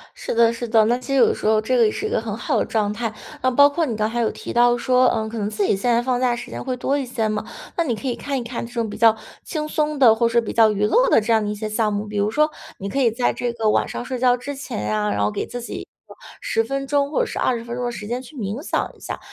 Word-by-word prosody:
是 - - -4
的 230 0 +4
是 235 0 -5
的， 220 -1 +5
那 240 +3 +2
其 250 - -12
实 275 - 0
有 270 - +6
的 - - +1
时 - - -5
候 215 0 +4
这 255 +4 0
个 235 -2 +5
也 - - +2
是 410 - -4
一 430 - -3
个 - - +1
很 - - -5
好 - - -1
的 - - +1
状 210 -2 0
态， 230 +1 -3 0.3
那 255 - +2
包 285 +3 +6
括 325 +2 0
你 230 -4 -3
刚 215 +1 0
才 240 +1 -2
有 225 - +1
提 - - -7
到 240 0 +4
说， 255 +1 +3
呃， 220 -1 0
可 225 +1 -6
能 205 -1 -1
自 210 -1 -1
己 - - +2
现 200 +6 0
在 235 +1 +3
放 250 0 0
假 245 -2 +2
时 235 - -8
间 - - -6
会 255 -1 -3
多 275 +3 0
一 270 - -3
些 230 -3 -1
嘛， 215 0 -3 0.3
那 340 - +1
你 240 -6 -1
可 275 - -7
以 250 - 0
看 275 +2 -3
一 245 - -4
看 235 0 -5
这 240 - -14
种 230 -3 -2
比 - - -8
较 225 -1 +5 0.3
轻 305 -3 -4
松 305 -1 -1
的， 235 -5 +7
或 230 +1 +2
是 235 0 +3
比 230 - -5
较 225 -1 +5
娱 210 0 0
乐 - - +3
的 - - +5
这 220 +2 0
样 220 -1 +3
的 210 - -2
一 210 - -2
些 215 +1 -4
项 215 0 0
目。 205 +1 -2
比 210 0 -4
如 205 +1 +1
说 305 +6 +2 0.3
你 195 - -5
可 275 - -1
以 240 -4 +4
在 240 +2 0
这 245 -1 -3
个 220 -2 +1
晚 - - +1
上 - - -5
睡 255 0 -4
觉 245 0 +4
之 285 +3 -6
前 275 - -5
呀， 105 0 0
然 100 0 -1
后 105 - +2
给 - - -3
自 245 -1 -6
己 - - -7
一 - - -8 0.2
个 - - -13 0.3
10 - - +1
分 275 -6 -3
钟 285 0 +1
或 305 - 0
者 - - +2
是 - - -5
20 235 -2 0
分 235 0 -5
钟 245 0 -3
的 - - -1
时 210 - -7
间 245 +3 -3
去 270 +3 -13
冥 215 +3 -4
想 - - -2
一 - - -22
下。 - - -5
235 Hz, 355 characters per minute, -22 LUFS, 220-260 Hz, 0.3 s, 的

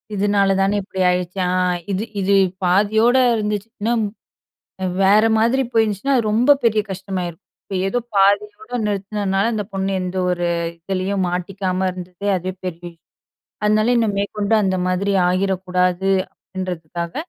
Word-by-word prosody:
இதுனால 200 0 +2
தானே 195 +2 +2
இப்படி 190 0 -8
ஆயிருச்சு. 180 +1 -2
ஆ - - 0 0.4
இது 195 +2 -1 0.2
இது 195 +1 +1 0.3
பாதியோடு 220 +7 +3
இருந்துச்சு, 210 0 -2
இன்னும் 225 +1 +1 1.0
வேற 205 +3 +5
மாதிரி 235 +4 +2
போயிருஞ்சுன்னா, 225 +4 +1
அது 240 - +2
ரொம்ப 240 +6 +4
பெரிய 220 -2 +3
கஷ்டமாயிருக்கும். 185 -2 -5 0.2
இப்போ, 195 - -6
ஏதோ 245 +5 0 0.2
பாதியோட 205 +3 +2 0.2
நிறுத்தினதுனால 200 0 -1
இந்த 215 -1 -1
பொண்ணு 195 0 -1
எந்த 185 +1 -4
ஒரு 175 -1 -1 0.3
இதுலேயும் 190 +2 -1
மாட்டிக்காம 185 +1 -2
இருந்தது, 180 +1 -9
அதுவே 185 +1 -3
பெரிய 175 -1 -6 0.7
அதுனாலயே, 215 +3 +3
"இன்னும் 215 -3 0
மேற்கொண்டு 205 +1 0
அந்த 190 -1 +1
மாதிரி 190 +2 0 0.2
ஆகிறக்கூடாது." 185 0 0 0.2
அப்படீன்றதுக்காக, 170 -2 -6
195 Hz, 130 wpm, -20 LUFS, 185-210 Hz, 1.0 s, வேற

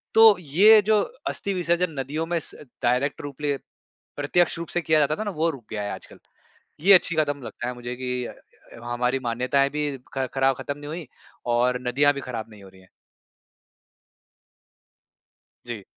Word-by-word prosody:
तो 220 -3 +8
ये 195 +8 +6
जो 215 -1 +4 0.3
अस्थि 200 - -2
विसर्जन 175 -1 0
नदियों 145 +5 -2
में 170 0 0
स - - -10 0.3
डायरेक्ट 125 +4 +1
रूप 145 0 -8
ले 145 -1 +1 0.6
प्रत्यक्ष 160 +4 +1
रूप 170 - -5
से 175 - 0
किया 160 -2 +3
जाता 150 +1 +2
था 215 - -4
ना, 205 - -3
वो 165 -1 0
रुक 130 -7 -11
गया 105 -2 -3
है 100 - -3
आजकल। - - -10 0.6
ये 195 +6 +6
अच्छी 175 -2 +4
क़दम 145 -3 0
लगता 120 - -5
है 125 - -4
मुझे 120 0 -6
कि 125 0 -3
अ, - - -8 0.5
हमारी 125 +2 0
मान्यताएँ 130 +4 +1
भी 150 +1 -1 0.3
ख़ 135 -1 0
ख़राब 135 -1 +2
ख़त्म 145 0 -5
नहीं 145 0 -9
हुई 160 -2 -6 0.5
और 125 +1 +2
नदियाँ 145 +4 +4
भी 140 - -4
ख़राब 115 -4 -6
नहीं 105 -2 -14
हो - - -12
रही 95 0 -19
हैं। 95 - -23 2.8
जी। 120 -4 -6
145 Hz, 180 wpm, -25 LUFS, 125-165 Hz, 2.8 s, तो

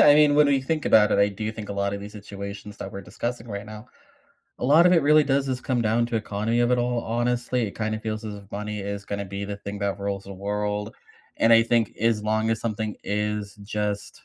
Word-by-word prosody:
I 145 - +8
mean, 150 -1 +5
when 150 0 +6
we 140 -1 +3
think 155 +3 -2
about 105 -1 +5
it, - - +3
I 100 0 +5
do 105 +2 -4
think 110 -2 -8
a 100 - -3
lot 100 0 -1
of 100 - -5
these 105 +1 -8
situations 100 0 -8
that - - -6
we're 100 - -7
discussing 120 +3 -5
right 100 0 -5
now 110 +2 -9 0.7
a - - -2
lot 155 +7 +6
of 180 - +5
it 165 -3 +5
really 150 +1 +6
does 140 -1 +1
just 130 -1 -2
come 125 -2 0
down 115 +1 +2
to 120 -1 -2
economy 110 +2 -1
of 120 +1 +3
it 125 - +3
all, 120 0 0
honestly. 120 +1 0
It - - -12
kinda 110 0 -1
feels 110 0 -4
as 105 -1 -5
if 100 -1 -12
money 105 +1 -4
is 100 0 -5
gonna 100 0 -4
be 100 +1 -5
the 100 0 -5
thing 100 0 -6
that 100 0 -2
rules 100 0 -3
the 100 - -8
world. 105 +2 -3 0.4
And 115 - +4
I 115 0 +8
think 115 -1 +1
as 110 -2 +1
long 110 +1 +1
as 110 - +1
something 110 -1 -3
is 105 0 -2
just 105 0 -4
110 Hz, 250 wpm, -25 LUFS, 100-120 Hz, 0.7 s, I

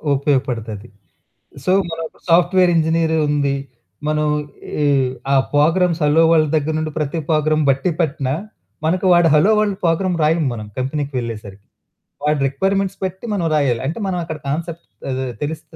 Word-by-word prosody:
ఉపయోగపడుతాది. 125 -6 -1 0.8
సో, 185 - +2 0.2
మనం 165 0 -4
ఇప్పుడు - - -26
సాఫ్ట్‌వేర్ 180 +1 +4
ఇంజినీరు 160 0 +2
ఉంది, 140 -2 +1 0.5
మనం 150 0 +1 0.6
ఈ - - +3 0.5
ఆ - - +4 0.2
ప్రోగ్రామ్స్ 165 +3 +3
హలో 155 +3 +4
వరల్డ్ 155 -2 +3
దగ్గర 155 +1 -1
నుండి, 155 0 -3
ప్రతి 150 +2 -2
ప్రోగ్రామ్ 155 -1 +2
బట్టి 135 +6 +1
పట్టిన, 140 -4 -1 0.6
మనకు 180 +4 +1
వాడు 175 -1 +5
హలో 185 +8 +5
వరల్డ్ 205 -2 0
ప్రోగ్రామ్ 175 +2 +1
రాయము 155 0 +2
మనం 110 -2 -7
కంపెనీకి 140 +2 -2
వెళ్ళేసరికి. 105 -4 -7 0.6
వాడి 150 0 +2
రిక్వైర్‌మెంట్స్ 195 +6 -1
బట్టి 190 +3 -6
మనం 185 -5 -1
రాయాలి. 135 -6 +1
అంటే 160 +10 -3
మనం 185 -2 -1
అక్కడ 160 -2 -5
కాన్సెప్ట్ 165 +3 -4 0.2
ఆహ్, 130 -1 -2
తెలిస్తే 160 +2 -6
155 Hz, 150 wpm, -19 LUFS, 140-170 Hz, 0.8 s, వాడు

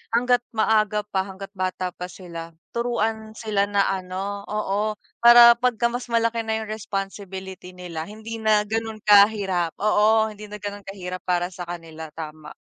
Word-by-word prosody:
hangga't 245 0 +3
maaga 215 -1 +2
pa 190 -2 0
hangga't 195 0 -9
bata 185 -1 -2
pa 180 - -6
sila 170 -3 -8 0.2
turuan 225 -2 -1
sila 210 -3 0
na, 200 -1 +3
ano 195 +2 -3
oo, 210 0 -1 0.3
para 235 0 +10
'pagka 235 -1 +1
mas 245 0 -5
malaki 230 0 +1
na 220 0 -1
yung 220 - -5
responsibility 195 -3 -6
nila 180 -3 -7
hindi 220 +5 -8
na 215 -1 +3
ganun 225 0 -2
kahirap 200 -4 +5
oo, 215 +1 +4
hindi 210 0 -12
na 210 - -5
ganun 205 0 -6
kahirap 185 -2 -6
para 175 -1 0
sa 175 - -6
kanila, 160 -2 -7
tama. 155 -1 -8
205 Hz, 155 wpm, -24 LUFS, 185-220 Hz, 0.3 s, para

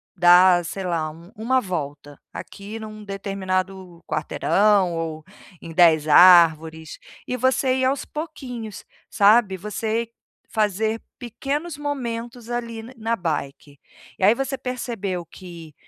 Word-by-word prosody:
dar, 175 0 +6
sei 190 +3 -5
lá, 165 -3 -1
u 170 +5 -15
uma 250 +5 +1
volta 145 -6 -6
aqui 210 +3 -8
num 215 -1 -9
determinado 190 -3 -4
quarteirão 195 +3 +2
ou 160 -1 -5 0.4
em 165 - -9
10 160 -3 +4
árvores". 160 -1 +5 0.3
E 250 - -2
você 260 +1 +1
ir 260 - +1
aos 270 +1 0
pouquinhos, 250 - -7 0.2
sabe, 205 -1 +4
você 220 +3 -3 0.4
fazer 215 +1 0 0.2
pequenos 280 +7 -4
momentos 240 -4 -5
ali 230 -2 -4
na 250 +3 -11
na 225 +1 -1
bike. 145 -5 -5 0.4
E - - -4
aí 210 +4 +6
você 270 +1 -2
percebeu 230 -8 -4
que 170 -4 -12
200 Hz, 125 wpm, -22 LUFS, 175-235 Hz, 0.4 s, dar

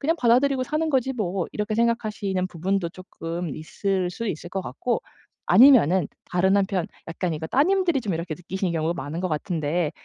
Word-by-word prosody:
그냥 320 +4 +2
받아들이고 255 +3 +3
사는 305 +4 -1
거지 265 -1 +1
뭐.' 190 -6 -2
이렇게 210 0 -2
생각하시는 215 -5 0
부분도 180 +1 -1
쪼끔 170 -3 -6
있을 185 +3 -2
수 230 +5 -5
있을 175 +1 -5
것 190 - -2
같고 205 - -2 0.5
아니면은 215 - +6 0.2
다른 190 +2 +3
한편 190 -3 +1 0.2
약간 170 +1 -2
이거 160 +1 -4
따님들이 345 +1 +2
좀 205 -7 -2
이렇게 165 -1 -3
느끼시는 180 +1 -3
경우가 165 +1 0
많은 145 +5 -5
것 185 - -1
같은데 155 0 -1
190 Hz, 395 characters per minute, -24 LUFS, 170-235 Hz, 0.5 s, 아니면은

